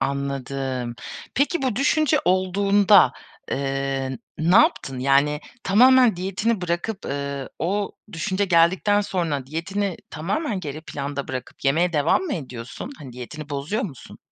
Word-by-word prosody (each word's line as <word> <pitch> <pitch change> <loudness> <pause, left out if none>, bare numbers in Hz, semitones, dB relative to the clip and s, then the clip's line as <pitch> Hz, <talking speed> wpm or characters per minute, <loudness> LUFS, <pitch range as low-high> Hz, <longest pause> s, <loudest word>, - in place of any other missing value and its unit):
anladım. 135 -3 -3 0.4
Peki 285 +3 +1
bu 255 -6 0
düşünce 295 +2 +3
olduğunda, 190 - +4 0.4
eee, 135 -1 -2 0.2
ne 170 +5 +4
yaptın? 135 - +3
Yani 140 +3 +2 0.2
tamamen 250 +1 +6
diyetini 195 +4 -1
bırakıp, 180 +4 -3
ııı, 140 -1 -4
o 200 +4 -1 0.2
düşünce 190 +4 -1
geldikten 185 +3 +3
sonra 165 -9 -2
diyetini 180 +5 -2
tamamen 195 - -2
geri 155 -2 -6
planda 140 -2 -5
bırakıp 130 +1 -7
yemeye 170 +6 +2
devam 150 - +2
mı 335 -8 -2
ediyorsun? 125 - -7
Hani 130 -4 -10
diyetini 145 +5 -8
bozuyor 145 - -2
musun? 145 - -8
165 Hz, 125 wpm, -23 LUFS, 140-200 Hz, 0.4 s, tamamen